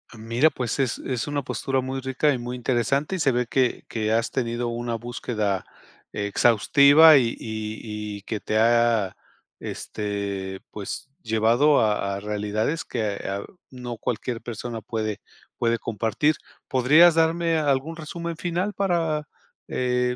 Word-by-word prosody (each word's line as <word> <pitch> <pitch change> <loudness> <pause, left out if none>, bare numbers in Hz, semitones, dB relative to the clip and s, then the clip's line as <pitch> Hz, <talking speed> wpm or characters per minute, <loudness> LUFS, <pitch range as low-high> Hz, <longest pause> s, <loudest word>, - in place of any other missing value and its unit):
Mira, 115 +7 +2
pues, 125 -2 -3
es 130 -4 0
es 125 -3 -3
una 145 -1 -1
postura 135 0 -1
muy 130 +1 -4
rica 130 +3 +1
y 130 - -2
muy 120 +1 -5
interesante, 130 - 0
y - - -7
se 135 -5 +2
ve 125 +1 +1
que 125 +1 0
que 110 -1 -1
has 115 +1 +1
tenido 120 -1 -1
una 120 0 -3
búsqueda 110 -4 -2 0.5
exhaustiva 140 +9 +6
y 120 -3 +2
y 105 -1 -5
y - - -12
que 105 +1 -4
te 110 +1 -1
ha, 115 -3 +3 0.4
este, 100 -2 -4
pues 105 +5 -6
llevado 115 +7 +3
a 105 -2 0
a - - -4
realidades 105 +8 -2
que, 105 -4 -2
ah, 100 +1 -3 0.3
no 125 -2 -7
cualquier 120 +1 -3
persona 120 0 -5
puede 110 -2 -3 0.4
puede 115 -1 +1
compartir. 115 +7 0 0.3
¿Podrías 150 +7 +6
darme 165 0 +2
algún 145 +2 0
resumen 170 +1 -5
final 180 +4 -2
para, 165 -6 0 0.4
eh, 125 0 0
120 Hz, 145 wpm, -24 LUFS, 110-140 Hz, 0.5 s, exhaustiva